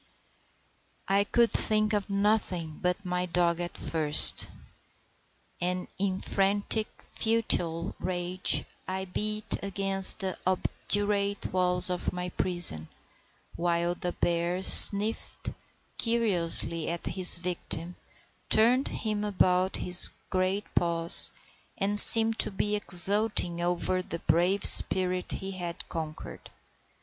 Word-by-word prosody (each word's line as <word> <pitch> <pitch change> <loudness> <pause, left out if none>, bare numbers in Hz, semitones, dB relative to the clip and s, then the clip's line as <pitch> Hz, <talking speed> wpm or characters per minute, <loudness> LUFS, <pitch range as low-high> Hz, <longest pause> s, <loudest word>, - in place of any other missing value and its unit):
I 195 +1 0
could 235 +2 0
think 215 0 -2
of 205 -1 -4
nothing 195 -6 -3
but 180 +2 -4
my 180 0 -4
dog 170 -1 -2
at 175 0 -7
first; 155 -2 +4 1.1
and 180 +1 -4
in 190 -1 -3
frantic, 205 +2 -1 0.2
futile 175 -7 -2
rage 180 0 -2 0.2
I 190 0 -5
beat 210 +3 -3
against 195 -1 +2
the 190 -3 -6
obdurate 200 +2 -3
walls 180 0 -1
of 180 - -3
my 180 0 -7
prison, 175 - +1 0.7
while 170 0 -2
the 175 0 -7
bear 175 +2 -3
sniffed 210 +3 +5 0.5
curiously 180 -8 0
at 170 0 -6
his 185 -2 +4
victim, 175 -1 -3 0.5
turned 240 +5 +3
him 210 -2 -5
about 185 -2 -1
with - - -6
his 180 0 +4 0.2
great 185 +2 -3
paws, 170 -1 +2 0.5
and 205 +1 +4
seemed 225 0 +8
to - - +3
be 205 +1 -3
exulting 200 -2 0
over 180 +1 -3
the 170 - -8
brave 180 +4 -1
spirit 185 -1 +3
he 195 0 -7
had 175 -2 -8
conquered. 160 -2 -9
185 Hz, 115 wpm, -26 LUFS, 175-205 Hz, 1.1 s, seemed